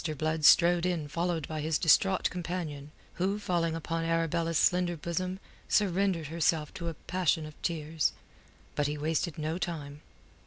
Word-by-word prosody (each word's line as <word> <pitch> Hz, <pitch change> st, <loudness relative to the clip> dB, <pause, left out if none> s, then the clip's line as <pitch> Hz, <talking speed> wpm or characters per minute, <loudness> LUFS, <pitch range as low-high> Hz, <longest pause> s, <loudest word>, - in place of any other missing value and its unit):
Blood 155 Hz, +1 st, 0 dB
strode 170 Hz, +2 st, +6 dB
in 170 Hz, -5 st, -2 dB
followed 165 Hz, 0 st, -2 dB
by 155 Hz, -1 st, -4 dB
his 155 Hz, 0 st, +1 dB
distraught 190 Hz, +3 st, +4 dB
companion, 165 Hz, -5 st, -4 dB, 0.3 s
who, 195 Hz, +2 st, +1 dB
falling 170 Hz, -5 st, 0 dB
upon 165 Hz, 0 st, -3 dB
Arabella's 165 Hz, 0 st, 0 dB
slender 175 Hz, -1 st, +2 dB
bosom, 180 Hz, +4 st, -3 dB, 0.3 s
surrendered 195 Hz, -4 st, +2 dB
herself 160 Hz, 0 st, 0 dB
to 170 Hz, -, -5 dB
a 165 Hz, -, -3 dB
passion 170 Hz, -2 st, 0 dB
of 155 Hz, -, -9 dB
tears. 160 Hz, -2 st, 0 dB, 0.6 s
But 145 Hz, -, 0 dB
he 150 Hz, +1 st, -3 dB
wasted 160 Hz, +2 st, -1 dB
no 155 Hz, +3 st, -2 dB
time. 150 Hz, -5 st, -5 dB
165 Hz, 150 wpm, -30 LUFS, 155-175 Hz, 0.6 s, strode